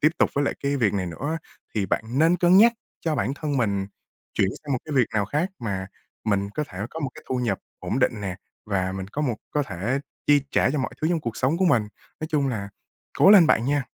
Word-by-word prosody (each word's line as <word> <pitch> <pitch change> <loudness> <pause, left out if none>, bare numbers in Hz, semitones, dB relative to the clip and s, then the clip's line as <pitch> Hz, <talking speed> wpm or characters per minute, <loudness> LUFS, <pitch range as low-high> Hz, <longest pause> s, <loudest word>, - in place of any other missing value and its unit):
tiếp 155 +2 +4
tục - - +3
với 140 0 +2
lại - - 0
cái 140 0 0
việc 110 -7 +2
này 95 -2 -1
nữa" 85 - -5
á, 165 - -1 0.4
thì 100 -3 0
bạn 110 - 0
nên 165 +3 +5
cân 175 +2 +5
nhắc 230 +3 +8 0.3
cho 160 -2 0
bản 135 0 -1
thân 145 -2 -2
mình 100 -5 0 0.5
chuyển 95 - +2
sang 145 -2 -3
một 130 - +1
cái 155 - -6
việc 130 -5 +4
nào 105 -2 +2
khác 150 - -1
mà 100 -5 -3 0.4
mình 100 -1 0
có 150 +9 -2
thể 90 - -9
có 160 - -6
một 140 -3 -2
cái - - -12
thu 130 - 0
nhập 115 -6 0 0.2
ổn 125 - -2
định 115 -5 +1
nè, 95 -2 -4 0.3
và 95 -2 0
mình 95 0 -5
có 150 +8 -3
một 120 -6 0
có 150 - +1
thể 120 +4 -2 0.3
chi 145 -1 +6
trả - - +3
cho 150 - -1
mọi 130 - -2
thứ 155 - +1
trong 170 -2 +1
cuộc 115 -4 -4
sống 135 +6 +1
của 190 - +3
mình. 125 -11 +4 0.4
Nói 155 - -2
chung 145 -4 +1
là 100 -5 -3 0.5
cố 195 - +8
lên 190 -6 +9
bạn 115 - +3
nha! 140 0 +1
130 Hz, 255 wpm, -25 LUFS, 100-150 Hz, 0.5 s, lên